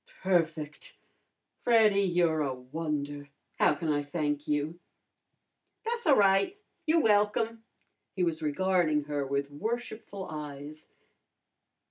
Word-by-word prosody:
"Perfect! 170 - -1 0.7
Freddy, 220 -4 +5
you're 175 -4 +2
a 135 -3 -1
wonder. 145 +1 -4 0.3
How 150 - +4
can 160 +2 -3
I 145 - +1
thank 145 0 -2
you?" 150 +3 -1 1.1
"Tha's 470 -3 -2
a'right. 200 - +4 0.3
You're 325 +1 +4
welcome." 220 +1 +2 0.5
He 185 - 0
was 165 -2 0
regarding 155 -1 +1
her 145 -1 -2
with 140 +1 -2
worshipful 220 +2 -5
eyes. 150 0 -8
165 Hz, 105 wpm, -29 LUFS, 145-205 Hz, 1.1 s, Freddy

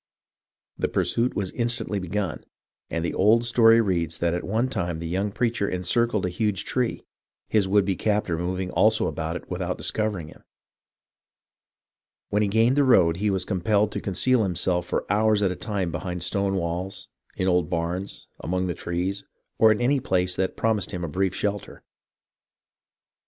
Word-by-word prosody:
The - - +1
pursuit 120 +2 0
was 95 -2 -2
instantly 115 -3 0
begun, 90 -4 -3 0.5
and 85 0 -2
the - - -2
old 110 +5 +4
story 115 -1 +5
reads 85 -7 0
that 85 0 0
at 85 - -2
one 110 +6 0
time 85 -10 -3
the 85 +1 -5
young 95 +4 -1
preacher 115 -2 0
encircled 105 +4 0
a - - 0
huge 95 +1 -1
tree, 125 -3 -1 0.5
his 105 -3 +2
would 100 0 +3
be 95 -1 0
captor 105 -3 0
moving 90 +2 -3
also 110 +1 +3
about 80 +2 -3
it - - -7
without 90 0 -3
discovering 105 -8 -1
him. - - -17 1.9
When 105 - +2
he 105 - +2
gained 115 +6 +3
the 145 - +5
road, 90 -11 +4
he 105 +2 0
was 95 -2 -1
compelled 105 +2 +1
to - - -4
conceal 115 +6 +2
himself 90 -2 0
for - - -1
hours 105 +1 +2
at 95 - +2
a - - -3
time 95 -4 -3
behind 90 +1 -3
stone 100 +1 0
walls, 90 +2 -3 0.3
in 95 - -1
old 90 -4 +2
barns, 85 +3 -3
among 90 +2 -1
the 90 - -1
trees, 90 +4 -3 0.4
or 110 -1 +7
in 105 - +1
any 135 +3 +2
place 90 -5 0
that 95 0 -1
promised 110 -3 0
him 90 -2 -5
a - - -2
brief 95 +3 -1
shelter. 105 -1 -3
95 Hz, 175 wpm, -25 LUFS, 90-110 Hz, 1.9 s, or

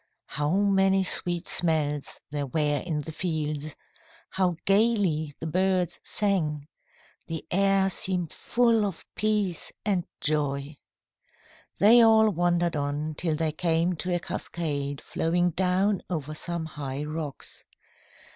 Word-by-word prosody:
How 145 +1 -1
many 195 -1 +3
sweet 175 -1 0
smells 150 -4 0
there 145 -1 -2
were 145 +5 -2 0.2
in 160 -4 -3
the 160 - -7
fields! 155 -3 -3 0.6
How 185 -2 +1
gaily 195 -8 +2
the - - -5
birds 185 +1 0
sang! 155 -8 0 0.6
The 165 -1 -5
air 195 +1 +3
seemed 180 -3 -2
full 235 -2 +2
of 185 -5 -7
peace 210 -5 -1
and 190 -4 0
joy. 145 -1 -1 1.0
They 230 +4 +7
all 220 -1 +6
wandered 175 -1 +1
on 145 +2 -2
till 160 +1 -1
they 160 0 0
came 165 +2 +1
to 180 +2 -1
a - - 0
cascade 145 -5 -4
flowing 175 +2 0
down 190 +3 +1
over 155 -4 -3
some 170 +1 -3
high 145 -2 -5
rocks. 150 -2 -4
170 Hz, 125 wpm, -27 LUFS, 150-190 Hz, 1.0 s, They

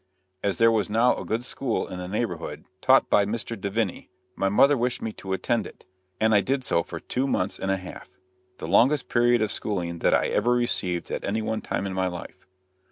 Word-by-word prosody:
As 100 - -1
there 115 0 +5
was 110 -3 +1
now 115 +4 +3
a - - -6
good 115 +2 -2
school 125 -2 -2
in 90 - -7
the 90 - -5
neighborhood, 95 -4 -4 0.2
taught 130 +1 +5
by 100 - +4
Mr. 115 +3 -3
Divinny, 100 -1 -3 0.3
my 95 - +1
mother 135 +8 +5
wished 125 0 -1
me 110 - -4
to 95 - -8
attend 110 +3 0
it, - - -16 0.3
and 110 0 +3
I 105 - +5
did 135 +4 -1
so 85 - +2
for - - -7
two 130 +2 -2
months 95 -6 -1
and 95 - -2
a 95 - +2
half 95 -1 -10 0.5
the - - -6
longest 135 +2 +3
period 120 -1 +3
of 110 - -1
schooling 85 -5 -3
that - - +3
I - - +2
ever 120 - +2
received 100 -8 -1
at - - -3
any 110 +2 -1
one 110 0 -2
time - - -3
in 95 - -3
my 95 0 0
life. 90 0 -8
110 Hz, 220 wpm, -25 LUFS, 95-120 Hz, 0.5 s, there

